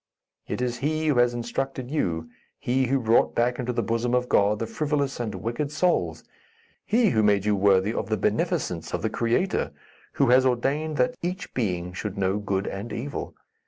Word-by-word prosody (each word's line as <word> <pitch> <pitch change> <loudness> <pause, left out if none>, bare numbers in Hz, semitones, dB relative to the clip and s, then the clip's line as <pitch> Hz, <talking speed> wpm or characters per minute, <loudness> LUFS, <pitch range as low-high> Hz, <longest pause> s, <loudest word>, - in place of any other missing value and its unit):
It 125 - -2
is 125 -1 -2
he 155 +3 -1
who 145 -5 +3
has 120 0 +3
instructed 125 +2 -3
you; 85 - -1 0.3
he 130 +1 0
who 135 +2 +2
brought 115 -1 +3
back 120 +1 +1
into 125 0 -1
the 120 - -1
bosom 115 +2 0
of 125 0 +1
God 105 +1 +3
the 115 - -2
frivolous 140 +3 -1
and 115 -3 -3
wicked 120 +6 -3
souls; 175 +3 0 0.6
he 225 -2 +3
who 110 - +3
made 100 -2 +3
you 105 -1 +3
worthy 100 +1 +3
of - - -3
the 110 - +1
beneficence - - -1
of - - -5
the - - 0
Creator, 120 +12 0 0.4
who 135 - +2
has 130 +1 +6
ordained 140 +5 0
that 250 - +2
each 180 +3 -4
being 90 -7 -2
should 100 +1 -5
know 95 +1 +1
good 100 -1 -1
and 105 +4 -5
evil. 125 +6 -5
120 Hz, 190 wpm, -25 LUFS, 105-140 Hz, 0.6 s, has